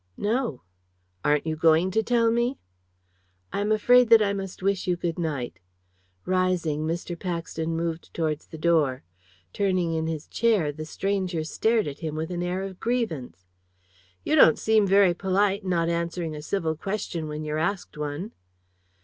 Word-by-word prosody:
"No." 215 Hz, -, -1 dB, 0.6 s
"Aren't 150 Hz, 0 st, +2 dB
you 160 Hz, -1 st, -1 dB
going 160 Hz, +3 st, +3 dB
to 220 Hz, +3 st, +2 dB
tell 230 Hz, 0 st, +2 dB
me?" 240 Hz, +3 st, 0 dB, 1.0 s
"I 200 Hz, -, -1 dB
am 210 Hz, +1 st, 0 dB
afraid 245 Hz, +3 st, +5 dB
that 230 Hz, -1 st, +9 dB
I 200 Hz, -2 st, +1 dB
must 195 Hz, -2 st, -6 dB
wish 195 Hz, -1 st, 0 dB
you 180 Hz, -, +2 dB
good 175 Hz, -1 st, -3 dB
night." 135 Hz, -, -3 dB, 0.7 s
Rising, 180 Hz, -5 st, 0 dB
Mr. 175 Hz, +2 st, -3 dB
Paxton 165 Hz, -2 st, -3 dB
moved 165 Hz, 0 st, -3 dB
towards 155 Hz, -2 st, -2 dB
the 160 Hz, -, -9 dB
door. 155 Hz, -, +2 dB, 0.5 s
Turning 185 Hz, -4 st, +1 dB
in 160 Hz, 0 st, -1 dB
his 160 Hz, -2 st, -4 dB
chair, 215 Hz, -10 st, +1 dB
the 155 Hz, +2 st, -7 dB
stranger 185 Hz, -1 st, -2 dB
stared 220 Hz, +6 st, +1 dB
at 140 Hz, -1 st, -6 dB
him 155 Hz, -3 st, -4 dB
with 160 Hz, +2 st, -3 dB
an 175 Hz, -1 st, -3 dB
air 180 Hz, +2 st, -2 dB
of 190 Hz, -2 st, -7 dB
grievance. 160 Hz, -, -2 dB, 0.8 s
"You -, -, +1 dB
don't 155 Hz, -, +7 dB
seem 220 Hz, -2 st, +3 dB
very 195 Hz, -2 st, +5 dB
polite, 195 Hz, +3 st, +1 dB
not 175 Hz, -3 st, 0 dB
answering 170 Hz, -1 st, -2 dB
a 150 Hz, -, -6 dB
civil 160 Hz, -1 st, -1 dB
question 175 Hz, -2 st, -4 dB
when 150 Hz, 0 st, -5 dB
you're 155 Hz, 0 st, -2 dB
asked 190 Hz, +3 st, -2 dB
one." 150 Hz, +7 st, -4 dB
175 Hz, 165 wpm, -26 LUFS, 160-200 Hz, 1.0 s, that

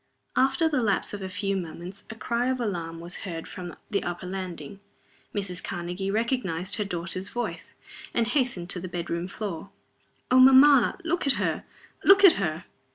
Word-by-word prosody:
After 270 Hz, +5 st, +3 dB
the 290 Hz, -5 st, +1 dB
lapse 205 Hz, -3 st, 0 dB
of 205 Hz, -, -5 dB
a 190 Hz, -, -4 dB
few 195 Hz, +1 st, -2 dB
moments 180 Hz, +1 st, -6 dB
a 220 Hz, -, -7 dB
cry 235 Hz, +2 st, -1 dB
of 260 Hz, 0 st, 0 dB
alarm 170 Hz, -7 st, -3 dB
was 170 Hz, +1 st, -7 dB
heard 165 Hz, -4 st, -6 dB
from 175 Hz, -2 st, -7 dB, 0.2 s
the 200 Hz, -, +1 dB
upper 175 Hz, +1 st, -5 dB
landing. 185 Hz, -2 st, -6 dB, 0.5 s
Mrs. 195 Hz, -4 st, -4 dB
Karnegie 180 Hz, +2 st, -4 dB
recognized 205 Hz, -5 st, -1 dB
her 210 Hz, -, 0 dB
daughter's 185 Hz, +1 st, -2 dB
voice, 240 Hz, +2 st, -5 dB, 0.4 s
and 235 Hz, -, +1 dB
hastened 240 Hz, -8 st, 0 dB
to 180 Hz, -, -2 dB
the 185 Hz, -, -6 dB
bedroom 170 Hz, 0 st, -3 dB
floor. 195 Hz, -2 st, -5 dB, 0.6 s
"Oh, 255 Hz, -, +6 dB
mamma! 265 Hz, -1 st, +7 dB
Look 340 Hz, -2 st, 0 dB
at 275 Hz, -, +5 dB
her! -, -, -1 dB, 0.4 s
look 390 Hz, +1 st, +7 dB
at 385 Hz, -, +11 dB
her!" 165 Hz, -1 st, -2 dB
195 Hz, 170 wpm, -26 LUFS, 175-240 Hz, 0.6 s, at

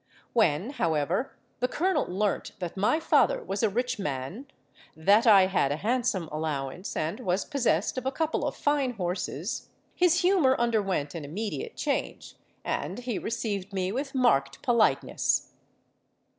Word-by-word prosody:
When, 210 Hz, -, +2 dB
however, 165 Hz, -, 0 dB, 0.3 s
the 250 Hz, -, +1 dB
colonel 335 Hz, +3 st, +1 dB
learnt 200 Hz, +3 st, -1 dB
that 175 Hz, -2 st, -5 dB
my 210 Hz, +11 st, +2 dB
father -, -, +3 dB
was 195 Hz, +1 st, -3 dB
a 220 Hz, -, +3 dB
rich 245 Hz, +3 st, -1 dB
man, 150 Hz, -, -4 dB, 0.5 s
that 200 Hz, +9 st, +4 dB
I 200 Hz, -4 st, +8 dB
had 185 Hz, -7 st, +1 dB
a -, -, +1 dB
handsome 225 Hz, -2 st, 0 dB
allowance, 155 Hz, +2 st, -3 dB
and 160 Hz, +8 st, -2 dB
was 190 Hz, -5 st, -1 dB
possessed 245 Hz, -, 0 dB
of 255 Hz, -, -5 dB
a -, -, +1 dB
couple 320 Hz, +2 st, -1 dB
of -, -, -3 dB
fine 285 Hz, -3 st, +1 dB
horses, 180 Hz, -4 st, -3 dB, 0.2 s
his 355 Hz, -1 st, +3 dB
humour 355 Hz, -8 st, +4 dB
underwent 200 Hz, -11 st, 0 dB
an 165 Hz, -3 st, -6 dB
immediate 210 Hz, -, -4 dB
change, -, -, -3 dB, 0.3 s
and -, -, -2 dB
he 245 Hz, -3 st, -3 dB
received 205 Hz, -4 st, -3 dB
me 185 Hz, -1 st, -1 dB
with 270 Hz, +4 st, -4 dB
marked 140 Hz, -, +2 dB
politeness. 235 Hz, -3 st, +2 dB
210 Hz, 145 wpm, -28 LUFS, 175-255 Hz, 0.5 s, I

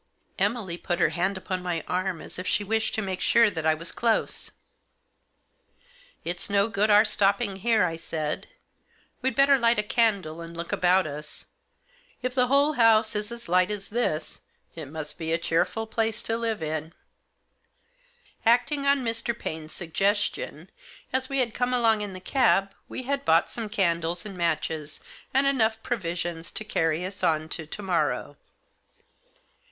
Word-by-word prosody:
Emily 200 Hz, -3 st, 0 dB
put 175 Hz, 0 st, -2 dB
her -, -, +4 dB
hand 190 Hz, +2 st, -1 dB
upon 185 Hz, 0 st, -3 dB
my 175 Hz, -3 st, -2 dB
arm, 185 Hz, -2 st, -1 dB
as -, -, -7 dB
if 185 Hz, -, -5 dB
she 210 Hz, -, +1 dB
wished 220 Hz, +2 st, 0 dB
to 220 Hz, -, -1 dB
make 190 Hz, -2 st, -4 dB
sure 230 Hz, -3 st, +5 dB
that 160 Hz, -3 st, -2 dB
I 155 Hz, -, +4 dB
was 165 Hz, +2 st, -8 dB
close. 230 Hz, -1 st, 0 dB, 1.8 s
"It's 175 Hz, +3 st, -3 dB
no 200 Hz, +1 st, +3 dB
good 215 Hz, 0 st, +1 dB
our 210 Hz, +1 st, +7 dB
stopping 200 Hz, 0 st, +1 dB
here," 220 Hz, +2 st, +3 dB
I 165 Hz, -2 st, -1 dB
said. 155 Hz, -2 st, -3 dB, 0.7 s
"We'd 260 Hz, -2 st, 0 dB
better 275 Hz, +1 st, +5 dB
light 235 Hz, 0 st, +3 dB
a 210 Hz, -, +2 dB
candle 200 Hz, -8 st, +1 dB
and 165 Hz, 0 st, -9 dB
look 170 Hz, +1 st, -5 dB
about 185 Hz, +1 st, +3 dB
us. 150 Hz, 0 st, -6 dB, 0.8 s
If 255 Hz, 0 st, -1 dB
the 250 Hz, -1 st, +3 dB
whole 280 Hz, +3 st, +4 dB
house 225 Hz, -4 st, +4 dB
is 210 Hz, +2 st, -3 dB
as 235 Hz, 0 st, -8 dB
light 180 Hz, +2 st, +3 dB
as 205 Hz, -2 st, -5 dB
this 205 Hz, -9 st, -2 dB, 0.3 s
it 160 Hz, -4 st, -7 dB
must 150 Hz, +1 st, -7 dB
be 160 Hz, -1 st, -3 dB
a 165 Hz, -, +3 dB
cheerful 180 Hz, +6 st, 0 dB
place 225 Hz, 0 st, -1 dB
to 225 Hz, -, -1 dB
live 225 Hz, -5 st, -2 dB
in." 155 Hz, +1 st, -3 dB, 1.5 s
Acting 250 Hz, +5 st, +3 dB
on 280 Hz, -2 st, +3 dB
Mr. 230 Hz, 0 st, -2 dB
Paine's 155 Hz, -5 st, -5 dB
suggestion, 200 Hz, -, -1 dB, 0.4 s
as 260 Hz, 0 st, 0 dB
we 275 Hz, -, -1 dB
had 245 Hz, -4 st, +1 dB
come 250 Hz, 0 st, 0 dB
along 225 Hz, -3 st, +4 dB
in 205 Hz, -2 st, -4 dB
the 185 Hz, -, -7 dB
cab 195 Hz, -2 st, +2 dB, 0.2 s
we 255 Hz, -, -5 dB
had 275 Hz, +2 st, -1 dB
bought 165 Hz, -8 st, +3 dB
some 225 Hz, -3 st, -5 dB
candles 170 Hz, -3 st, 0 dB
and 200 Hz, -2 st, -6 dB
matches, 155 Hz, -3 st, -2 dB, 0.3 s
and 270 Hz, +2 st, +3 dB
enough 225 Hz, -5 st, +2 dB
provisions 170 Hz, -7 st, -3 dB
to 215 Hz, -, -4 dB
carry 165 Hz, -4 st, 0 dB
us 190 Hz, 0 st, -7 dB
on 155 Hz, -2 st, +2 dB
to 160 Hz, -2 st, -6 dB
to 205 Hz, -, -7 dB
morrow. 150 Hz, -6 st, -1 dB
200 Hz, 170 wpm, -26 LUFS, 170-230 Hz, 1.8 s, our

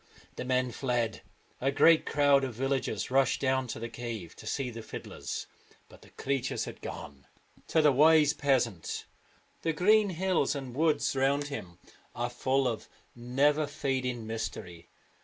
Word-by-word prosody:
The -, -, -5 dB
men 125 Hz, -1 st, +1 dB
fled. 120 Hz, -4 st, -1 dB, 0.4 s
A 135 Hz, -, +1 dB
great 160 Hz, +3 st, +5 dB
crowd 145 Hz, -2 st, +4 dB
of 130 Hz, -4 st, -3 dB
villagers 135 Hz, +1 st, -1 dB
rushed 135 Hz, -1 st, +3 dB
down 130 Hz, -1 st, +1 dB
to -, -, -5 dB
the 115 Hz, -, -4 dB
cave 115 Hz, -7 st, -6 dB
to -, -, -10 dB
see 135 Hz, -3 st, -2 dB
the 115 Hz, 0 st, -7 dB
fiddlers, 110 Hz, -, -6 dB, 0.4 s
but -, -, -16 dB
the -, -, -17 dB
creatures 135 Hz, -2 st, -2 dB
had -, -, -9 dB
gone. 70 Hz, 0 st, -8 dB, 0.4 s
To 160 Hz, -, +3 dB
the 150 Hz, -, +6 dB
wise 150 Hz, +2 st, +5 dB
peasant 120 Hz, -, 0 dB, 0.6 s
the 165 Hz, -, 0 dB
green 205 Hz, +5 st, +4 dB
hills 180 Hz, -5 st, +1 dB
and 135 Hz, -3 st, -6 dB
woods 155 Hz, -1 st, +2 dB
round 140 Hz, +2 st, +1 dB
him 90 Hz, -11 st, -7 dB, 0.4 s
are 120 Hz, 0 st, -2 dB
full 130 Hz, +2 st, +1 dB
of 115 Hz, -3 st, -4 dB, 0.3 s
never 140 Hz, +5 st, +2 dB
fading 130 Hz, -5 st, -2 dB
mystery. 90 Hz, -6 st, -6 dB
130 Hz, 155 wpm, -30 LUFS, 120-145 Hz, 0.6 s, the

